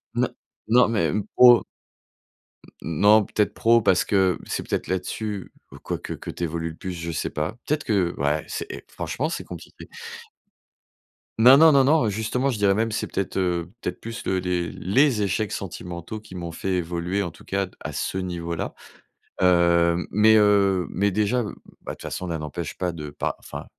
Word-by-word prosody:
Non, - - +1 0.4
non 125 +2 +5
mais 90 -9 +1
même 105 0 -1
pro 120 -1 +9
heu - - -13 1.2
non, 105 +7 +4
peut-être, 105 +1 0
pro 115 0 +4
parce 90 -3 +3
que 95 -3 +2
c'est - - -4
peut-être - - -2
là-dessus 100 +2 -4 0.2
ou - - -11
quoique, - - -5
que - - -9
tu - - -6
évolues 85 0 -3
le - - -12
plus. 95 - -6
Je 85 -1 -5
sais - - -2
pas. 75 +7 -3
Peut-être 150 0 -1
que 95 -5 +1
ouais 75 +2 0
c'est - - -4 0.2
franchement, 155 +5 -3
c'est 170 - -5
compliqué. - - -11 1.5
Non, 125 +4 +9
non, 160 +2 +8
non, 140 -2 +5
non, 140 -4 +3
justement, 115 +6 -1
je 115 - -4
dirais 100 -1 +3
même 115 +2 0
c'est 110 - -2
peut-être, 100 -1 -3
heu, 90 -1 -1
peut-être - - -4
plus 115 +1 -7
les 95 -1 +1
les 90 -1 -1
les 115 - +2
échecs 100 +2 -1
sentimentaux 90 +2 -6
qui 105 -3 -13
m'ont 85 -2 -5
fait 95 +3 -3
évoluer, 90 +3 -2
en 85 - -4
tout - - -17
cas 100 0 -1
à - - -6
ce 95 - -3
niveau 85 -2 -4
là. 85 - -4 0.7
Heu, 85 -1 +3
mais, 110 +2 +5
heu, 100 -4 +3
mais 100 +3 0
déjà, 105 +5 +1
bah, 105 - -5 0.4
de - - -2
toute - - -18
façon, 90 - -5
l'un 85 -2 -3
n'empêche 75 +2 -6
pas 90 -2 -2
de 75 -3 -7
pa 70 - -3
enfin - - -8
95 Hz, 190 wpm, -24 LUFS, 85-110 Hz, 1.5 s, pro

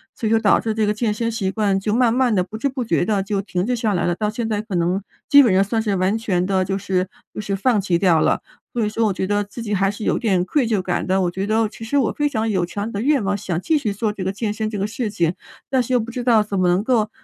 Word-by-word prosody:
所 225 - -5
以 - - +1
说 225 - +4
导 210 - +4
致 220 -1 -2
这 215 -1 +1
个 210 - +2
健 215 -1 -1
身 230 +2 -2
习 200 -4 -1
惯 200 -2 +1
就 210 +2 -1
慢 245 -2 +3
慢 250 -3 +2
地、 180 - +2
不 215 +4 -8
知 280 - 0
不 255 -2 -3
觉 175 -6 +1
地 200 -2 0
就 200 -1 -1
停 185 -1 -2
滞 250 +1 0
下 220 -3 0
来 175 - 0
了， 175 - +1
到 210 +1 -1
现 225 +1 -3
在 210 -1 -1
可 210 -4 -6
能， 175 +3 +1 0.3
基 285 0 +9
本 230 -8 +4
上 190 +1 +4
算 225 +3 -1
是 205 -3 0
完 185 +3 +1
全 185 -5 0
地 190 -1 +1
就 195 +1 -1
是 185 -1 -1 0.3
就 - - -5
是 200 -1 -2
放 215 0 +2
弃 180 -3 +1
掉 170 -4 +3
了。 - - +2 0.3
所 230 -3 0
以 - - 0
说 225 +1 0
我 195 - 0
觉 190 - -2
得 205 +1 0
自 205 +4 -9
己 210 -2 -3
还 195 0 +2
是 205 +1 -6
有 - - +1
点 190 -6 +1
愧 255 +3 +1
疚 210 -4 +1
感 180 -1 -2
的， 190 +1 +2
我 175 - 0
觉 190 +3 -3
得 220 0 +2
其 225 - -11
实 285 +6 -1
我 260 - +2
非 295 0 0
常 225 -3 -1
有 185 -4 +1
强 205 +4 -4
烈 230 - -5
的 200 - -3
愿 275 -3 +2
望， 200 +1 0
想 175 -4 -3
继 315 +7 +2
续 220 -8 -1
做 210 0 -1
这 195 - -5
个 190 - -1
健 210 +1 -3
身 215 0 -2
这 210 - -4
个 200 - -1
事 225 +1 -3
情， 175 -4 0 0.4
但 260 -1 +2
是 255 +2 -3
又 245 - +4
不 230 +1 -5
知 245 0 -4
道 225 -4 +4
怎 200 -2 -3
么 180 - +3
能 180 +3 +2
够， 225 -4 +1
210 Hz, 345 characters per minute, -21 LUFS, 190-225 Hz, 0.4 s, 基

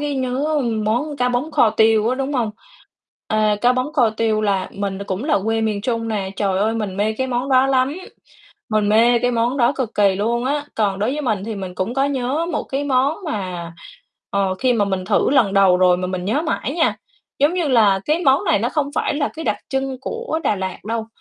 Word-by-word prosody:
cái 290 -1 -2
nhớ 270 +4 -1 0.2
món 255 +8 -1
cá 250 -2 +1
bống 250 +6 -1
kho 230 -7 +3
tiêu 220 0 +3
á, 255 - +1
đúng 270 +2 -3
hông? 235 -5 0 0.8
À, 215 -1 +2
cá 245 +1 +4
bống 255 +4 -2
kho 245 -7 +3
tiêu 220 -1 0
là 195 -3 0
mình 200 -1 -4
cũng 195 +7 -3
là 300 - +2
quê 225 0 0
miền 215 -2 -1
Trung 230 0 -2
nè. 200 -3 -2
Trời 195 -2 0
ơi, 220 +3 +1
mình 205 -4 -3
mê 210 +2 +1
cái 260 +4 -2
món 250 +1 -2
đó 260 0 +4
lắm, 265 +1 +1 0.7
mình 215 -2 +1
mê 235 +3 +4
cái 245 +1 +1
món 240 +2 0
đó 245 0 +3
cực 240 -4 -3
kỳ 200 -2 +3
luôn 235 +4 -1
á. 290 +2 -1
Còn 200 -3 0
đối 215 +5 0
với 300 - -3
mình 215 -7 -1
thì 225 0 -4
mình 185 -2 -6
cũng 185 +7 -3
có 270 +1 +2
nhớ 280 +3 -1
một - - -1
cái 275 +2 -3
món 275 +2 +1
mà, 180 - -4 0.6
ờ, 195 -1 0
khi 255 -1 +2
mà 220 -4 +2
mình 190 -2 -2
thử 205 +5 +2
lần 235 -8 +3
đầu 195 -2 +5
rồi 180 -1 +4
mà 180 0 -3
mình 180 -1 -4
nhớ 225 +11 0
mãi 320 -4 -2
nha. 330 -2 +1 0.4
Giống 295 +5 +3
như 345 -4 0
là 210 -7 +4
cái 310 +3 +1
món 270 0 +4
này - - +2
nó 230 +4 0
không 285 +1 -1
phải - - 0
là 290 0 0
cái 320 - -6
đặc - - 0
trưng 270 -1 -2
của 460 - -4
Đà 205 - +1
Lạt 190 -1 -4
đâu, 225 0 -3
235 Hz, 235 wpm, -20 LUFS, 205-270 Hz, 0.8 s, đầu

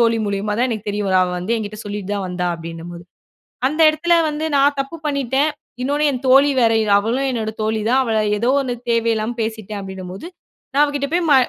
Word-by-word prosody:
தோழி 230 -1 +3
மூலியமா 200 +1 -2
தான் 250 - +3
எனக்கு 215 -3 -4
தெரிய 205 0 -2
வரு, 190 -1 +2
அவ 180 - 0
வந்து 195 +7 -1
என்கிட்ட 210 -1 -5
சொல்லிட்டு 205 -1 -5
தான் 200 -2 -3
வந்தா, 180 0 -2
அப்டின்னும்போது 165 +1 -8 0.6
அந்த 305 +4 -1
எடத்துல 325 +3 +2 0.2
வந்து 300 +1 -4
நான் 285 +1 +4
தப்பு 275 +5 -4
பண்ணிட்டேன். 280 +1 +1 0.3
இன்னொன்னு 290 +3 0
என் 255 -1 -4
தோழி 275 +2 +6
வேற, 225 -1 +4 0.3
அவளும் 245 +6 0
என்னோட 225 -3 -2
தோழி 220 0 0
தான் 260 +3 +4
அவ 235 - -3 0.3
ஏதோ 235 +4 0
1 255 -2 -2 0.2
தேவ 230 0 +1
இல்லாம 220 +2 -2
பேசிட்டேன், 220 -2 -4
அப்டின்னும்போது, 190 - -8 0.5
நான் 285 +2 +4
அவ 290 - -1
கிட்ட 280 0 -1
போயி 350 +1 +2
ம - - +7
230 Hz, 205 wpm, -20 LUFS, 205-275 Hz, 0.6 s, ம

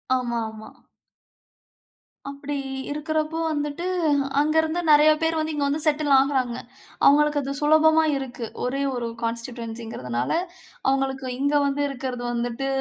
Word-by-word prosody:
ஆமா, 240 -2 -1
ஆமா. 220 0 -11 1.6
அப்படி 280 +1 -5 0.4
இருக்கிறப்போ 310 +2 -2
வந்துட்டு, 295 +3 -3 0.5
அங்கருந்து 315 +3 +2
நிறைய 300 +1 +7
பேர் 325 0 +1
வந்து 310 0 -2
இங்க 290 -1 0
வந்து 295 +2 0
செட்டில் 300 -1 +1
ஆகுறாங்க 265 -3 0 0.5
அவுங்களுக்கு 295 +1 +5
அது 275 0 -4
சுலபமா 315 +1 +5
இருக்கு. 250 -3 -5 0.2
ஒரே 270 +3 -1
1 240 -1 -3 0.2
கான்ஸ்டிட்யென்சிங்கிறதுனால, 230 - -4 0.6
அவங்களுக்கு 270 -1 0
இங்க 285 +2 +1
வந்து 280 +1 0
இருக்கிறது 255 -2 -5
வந்துட்டு, 240 +2 -2
280 Hz, 115 wpm, -24 LUFS, 245-300 Hz, 1.6 s, நிறைய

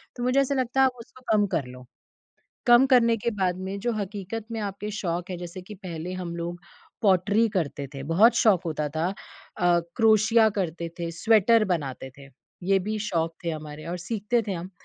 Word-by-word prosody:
तो 245 - -5
मुझे 255 +2 +3
ऐसा 275 +1 0
लगता 260 0 -1
है - - +7
आप 260 - +2
उसको 250 +2 -14
कम 210 -1 +4
कर 165 -8 -1
लो। 125 0 -11 0.8
कम 240 +2 +7
करने 235 -3 +4
के 230 +2 -2
बाद 190 -4 -1
में 190 +2 -5
जो 240 +3 -1
हकीकत 205 +1 -5
में 225 - -3
आपके 205 0 -4
शौक 180 -4 -3
है 180 - -3
जैसे 175 +1 -7
कि 210 +4 -10
पहले 180 -3 -6
हम 180 -2 -5
लोग 170 +1 -5 0.4
पॉटरी 205 +3 +3
करते 145 -5 -2
थे। 135 - -6
बहुत 215 +9 +6
शौक 200 -6 +4
होता 150 -2 -2
था, 165 +3 +1 0.5
अ, 175 -1 +3 0.2
क्रोशिया 220 0 +5
करते 170 -2 -2
थे, 170 -1 -3
स्वेटर 220 +5 +4
बनाते 135 -4 -5
थे। 140 0 -13 0.4
ये 195 0 +5
भी 215 +3 -3
शौक 165 -1 -1
थे 170 - 0
हमारे 155 -1 -7
और 180 - -3
सीखते 225 +5 -1
थे 195 - 0
हम। 175 +1 -6
190 Hz, 200 wpm, -26 LUFS, 170-225 Hz, 0.8 s, है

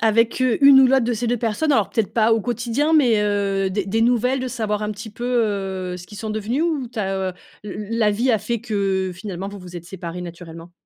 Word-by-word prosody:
avec, 230 +2 +2
heu, 255 -3 +2
une 275 -1 +9
ou 260 - +7
l'autre 265 0 +3
de 240 - 0
ces 235 +2 -2
2 240 +1 +1
personnes? 235 +7 0
Alors, 215 -6 +2
peut-être 225 -3 -1
pas 225 0 +3
au 225 - +3
quotidien, 240 +6 -1
mais, 245 -9 +4
heu, 200 -2 0
des 195 0 -1
des 225 +3 0
nouvelles, 250 +2 +2
de 255 0 -3
savoir 215 -2 -2
un 210 - -2
petit 215 +1 -9
peu, 235 +3 -7 0.7
heu, - - -5
ce 180 - -11
qu'ils 210 -1 -11
sont 220 -1 -4
devenus, 220 +8 -1
ou 305 -7 -1
tu 230 - -7
as, 190 -1 -1
heu, - - -11 0.3
l 210 0 -6
la 230 -2 +2
vie 240 +5 +1
a 220 - +3
fait 235 +2 -3
que, 195 -4 -1
finalement, 190 0 -6
vous 200 0 -8
vous 180 -1 -10
êtes 170 - -8
séparés 180 -1 -7
naturellement? 170 -1 -9
215 Hz, 250 wpm, -21 LUFS, 195-240 Hz, 0.7 s, une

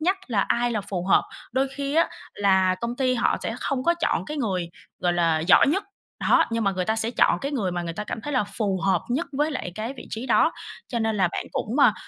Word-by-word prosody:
nhắc 365 +5 +2
là 225 -6 +1
ai 240 0 +1
là 220 - -1
phù 195 -3 -4
hợp. 195 - +5 0.3
Đôi 265 +2 +1
khi 280 0 -3
á 330 +2 +4 0.3
là 190 -2 +3
công 235 +1 -3
ty 255 -2 +1
họ 240 - +2
sẽ 225 - -2
không 265 -2 -1
có 340 - +4
chọn - - +1
cái 300 0 -5
người, 185 -9 -1 0.3
gọi 175 -1 +1
là, 165 -2 +2
giỏi 165 +4 +5
nhất, 350 +8 +1 0.4
đó, - - +4
nhưng 230 -1 0
mà 195 - +3
người 185 -1 -1
ta 220 +2 0
sẽ 225 +1 0
chọn - - +3
cái 280 +2 -3
người 200 -10 -1
mà 175 -1 -2
người 170 - -4
ta 210 +6 -5
cảm 220 - -5
thấy 295 - -4
là 255 -5 +2
phù 200 -2 -2
hợp 185 -3 +2
nhất 285 +8 -1
với 295 +3 +1
lại 255 - -4
cái 220 +4 -4
vị - - -10
trí 230 +4 -4
đó. 315 +7 +4 0.4
Cho 235 - -2
nên 220 -1 0
là 190 -3 +3
bạn - - -3
cũng, 235 +7 -2
à, 280 - +6
225 Hz, 265 wpm, -25 LUFS, 190-270 Hz, 0.4 s, à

